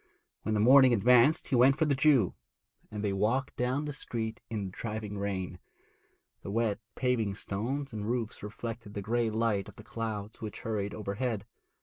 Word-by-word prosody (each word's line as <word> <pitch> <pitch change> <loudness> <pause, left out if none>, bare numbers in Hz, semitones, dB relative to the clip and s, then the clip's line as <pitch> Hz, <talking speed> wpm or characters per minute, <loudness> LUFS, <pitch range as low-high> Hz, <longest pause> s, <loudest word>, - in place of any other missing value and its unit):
When 110 +1 -1
the - - +2
morning 130 +3 +7
advanced 125 +6 +4
he - - +2
went 130 +3 +6
for 160 - +3
the 145 - +2
Jew, 135 - +4 0.6
and 105 -1 -5
they 100 -2 0
walked 115 +8 0
down 130 +4 0
the 150 - -3
street 115 -3 -4
in 105 -3 -2
the 95 - -6
driving 105 0 -5
rain. 95 -3 -3 0.8
The - - -7
wet 110 0 0 0.2
paving 115 -6 0
stones 125 +8 -3
and 105 0 -3
roofs 120 -3 -2
reflected 110 0 -6
the 100 - -3
grey 115 +2 +1
light 110 -2 0
of - - -14
the 105 - -12
clouds 110 -1 -5
which 105 -3 -6
hurried 105 -2 -2
overhead. 105 +1 -2
110 Hz, 180 wpm, -30 LUFS, 105-125 Hz, 0.8 s, morning